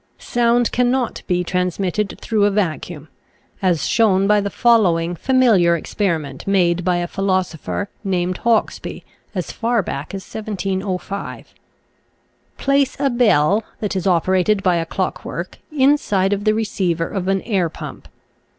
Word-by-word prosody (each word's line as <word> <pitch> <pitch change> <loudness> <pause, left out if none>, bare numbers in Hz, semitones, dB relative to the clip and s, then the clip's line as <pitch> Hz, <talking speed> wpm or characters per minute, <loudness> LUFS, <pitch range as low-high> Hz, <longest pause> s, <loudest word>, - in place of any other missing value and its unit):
Sound 240 0 +1
cannot 250 0 0
be 180 -1 +1
transmitted 180 +3 -1
through 215 -3 +1
a - - +4
vacuum, 175 -5 -2 0.5
as 175 -6 +1
shown 195 -4 +3
by 210 +1 +4
the 200 - -2
following 180 -7 +3
familiar 220 -7 +3
experiment 160 -6 -3
made 180 -3 +2
by 180 0 +2
a 175 0 -2
philosopher 185 0 -2 0.2
named 185 -2 -1
Hawksbee 230 -2 0 0.3
as 180 -3 -3
far 230 -2 0
back 145 +3 -5
as 195 - -6
1705. 195 -2 -4 1.0
Place 275 -1 +1
a 275 -1 +1
bell 210 -4 +3 0.2
that 210 -2 -3
is 190 0 -1
operated 185 +3 +2
by 180 -2 +3
a 165 -1 -2
clock - - -3
work - - -6
inside 265 -9 +2
of 205 +1 -3
the 215 0 +3
receiver 185 -6 -1
of 190 -2 -4
an 195 0 +1
air 190 -7 0
pump. - - -9
195 Hz, 140 wpm, -20 LUFS, 175-220 Hz, 1.0 s, a